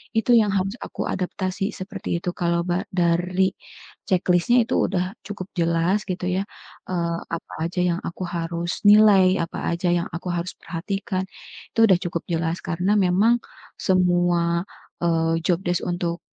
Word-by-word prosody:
itu 225 +2 +2
yang 215 -3 +4
harus 195 +3 0
aku - - -5
adaptasi 190 +2 -2
seperti 175 -2 -4
itu. 180 - -1
Kalau 170 -1 0
ba 180 +3 0
dari 180 +1 +2 0.6
checklist-nya 185 +6 +3
itu - - 0
udah 185 +1 -2
cukup 195 -2 -6
jelas 170 +4 +1
gitu 180 0 -3
ya, 190 +2 0 0.5
eee, 170 -2 -1 0.2
apa - - -10
aja 170 +2 -3
yang 175 0 +1
aku 180 +2 -5
harus 170 +3 -3
nilai, 200 -3 +6
apa 165 - -6
aja 170 +1 -1
yang 170 +1 -1
aku 170 - -6
harus 175 +1 -3
perhatikan, 190 +2 -3 0.5
itu - - -4
udah 190 -3 +5
cukup 170 -1 -3
jelas 165 +1 -1
karena 180 +4 0
memang 200 +6 +3 0.4
semua, 175 -2 +2 0.4
eee, 165 -1 +2
job 175 -1 +2
desc 175 -1 +1
untuk, 175 -1 -2
180 Hz, 150 wpm, -23 LUFS, 170-190 Hz, 0.6 s, nilai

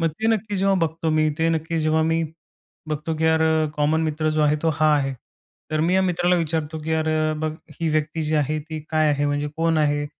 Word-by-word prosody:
मग 165 - +2
ते 165 +8 -4
नक्की 215 -2 0
जेव्हा 195 +1 +2
बघतो 160 0 -1
मी, 155 0 +2
ते 165 - +2
नक्की 165 0 -1
जेव्हा 155 0 +2
मी 165 +1 +1 0.7
बघतो, 155 +1 -2
की 160 - -1
यार 160 0 +3
अ, 160 -1 +2
कॉमन 150 +2 +2
मित्र 155 0 -1
जो 155 0 +1
आहे 150 0 +3
तो 165 - +2
हा 155 0 +4
आहे. 135 -1 -1 0.6
तर 155 0 0
मी 170 +3 +2
या 190 - +4
मित्राला 180 -1 +2
विचारतो, 160 -1 -2
की 160 +1 -2
अरे 155 0 0 0.2
बघ 155 -1 -1 0.3
ही 165 - +1
व्यक्ती 155 +1 -1
जी 155 0 -1
आहे 150 +1 0
ती 155 +1 -7
काय 155 -1 +2
आहे 145 0 0
म्हणजे 145 0 -1
कोण 165 0 +1
आहे 145 -1 +1
155 Hz, 230 wpm, -23 LUFS, 155-165 Hz, 0.7 s, हा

